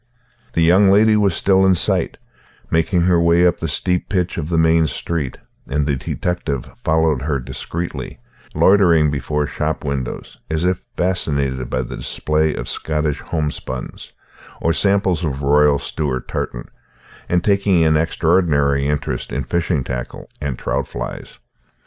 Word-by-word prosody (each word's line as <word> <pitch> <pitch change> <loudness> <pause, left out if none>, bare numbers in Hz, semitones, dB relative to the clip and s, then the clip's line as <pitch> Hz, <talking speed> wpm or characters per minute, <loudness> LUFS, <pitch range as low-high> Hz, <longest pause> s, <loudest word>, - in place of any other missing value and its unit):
The 85 - +2
young 95 +4 +5
lady 105 +2 +5
was 100 -4 +2
still 95 +1 +3
in 95 -1 +5
sight, - - +1 0.5
making 80 +2 +2
her 85 -1 +3
way 85 +1 +4
up 90 - +2
the 80 - -2
steep 90 +4 -1
pitch 90 -3 0
of 80 -1 -4
the 85 - +1
main 80 0 +4
street, 75 -1 -3 0.3
and 75 +1 0
the 70 -1 0
detective 70 -1 -3 0.2
followed 80 -3 +2
her 70 0 -1
discreetly, 85 +6 -6 0.4
loitering 85 -6 +4
before 75 +1 -1
shop 75 +1 -3
windows, 70 -3 -4
as 80 +2 -1
if 90 0 0 0.2
fascinated 70 -8 -1
by 65 - -1
the - - -7
display 75 0 0
of - - -5
Scottish 75 -2 -2
homespuns, 75 -5 -5 0.5
or 80 - +1
samples 95 -2 +1
of 70 -3 -3
Royal 75 +1 +4
Stewart 70 -3 -3
tartan, - - -4 0.6
and 90 0 +1
taking 100 -4 +3
an 80 0 +3
extraordinary 75 -4 +2
interest 75 -1 -2
in 70 - -2
fishing 85 +1 -1
tackle 60 -1 -6
and 70 -4 -3
trout - - -2
flies. - - -7
80 Hz, 150 wpm, -19 LUFS, 70-90 Hz, 0.6 s, young